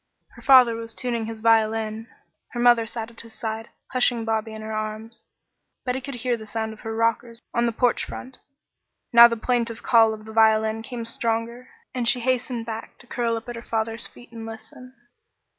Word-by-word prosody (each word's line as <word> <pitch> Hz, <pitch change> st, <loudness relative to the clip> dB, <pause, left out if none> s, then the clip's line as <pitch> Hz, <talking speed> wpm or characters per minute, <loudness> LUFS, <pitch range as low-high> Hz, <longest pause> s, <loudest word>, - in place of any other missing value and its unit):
Her -, -, -16 dB
father 255 Hz, -4 st, +7 dB
was 225 Hz, 0 st, -4 dB
tuning 235 Hz, -3 st, -2 dB
his 225 Hz, -1 st, -7 dB
violin. 225 Hz, 0 st, +2 dB, 0.5 s
Her 240 Hz, -, -4 dB
mother 240 Hz, -2 st, +5 dB
sat 225 Hz, 0 st, -5 dB
at 230 Hz, -, -8 dB
his 230 Hz, -1 st, -14 dB
side, 225 Hz, 0 st, -4 dB, 0.2 s
hushing 245 Hz, -3 st, +2 dB
Bobby 220 Hz, 0 st, -1 dB
in 220 Hz, 0 st, -8 dB
her 220 Hz, 0 st, -5 dB
arms. 215 Hz, +1 st, -5 dB, 0.6 s
Betty 255 Hz, +1 st, -1 dB
could 275 Hz, 0 st, -6 dB
hear 245 Hz, 0 st, 0 dB
the 220 Hz, -1 st, -10 dB
sound 220 Hz, 0 st, -3 dB
of 220 Hz, -, -15 dB
her 225 Hz, -1 st, -5 dB
rockers 230 Hz, +1 st, 0 dB
on 235 Hz, 0 st, +2 dB
the -, -, +1 dB
porch 245 Hz, +2 st, +1 dB
floor. 255 Hz, -, -8 dB, 0.8 s
Now 235 Hz, 0 st, +11 dB
the 230 Hz, -1 st, -3 dB
plaintive 235 Hz, -1 st, -1 dB
call 225 Hz, -2 st, +5 dB
of 215 Hz, 0 st, -14 dB
the 220 Hz, -, -9 dB
violin 220 Hz, 0 st, +3 dB
came 235 Hz, 0 st, -6 dB
stronger, 230 Hz, +2 st, -3 dB, 0.2 s
and 245 Hz, -2 st, -1 dB
she 250 Hz, 0 st, +3 dB
hastened 250 Hz, -1 st, -1 dB
back 225 Hz, 0 st, -7 dB
to -, -, -17 dB
curl 235 Hz, -2 st, -1 dB
up 225 Hz, -, -9 dB
at 240 Hz, -, -5 dB
her 230 Hz, -, -7 dB
father's 225 Hz, 0 st, -2 dB
feet 240 Hz, -1 st, -17 dB
and 230 Hz, -1 st, -8 dB
listen. 225 Hz, +3 st, -10 dB
230 Hz, 195 wpm, -24 LUFS, 220-240 Hz, 0.8 s, Now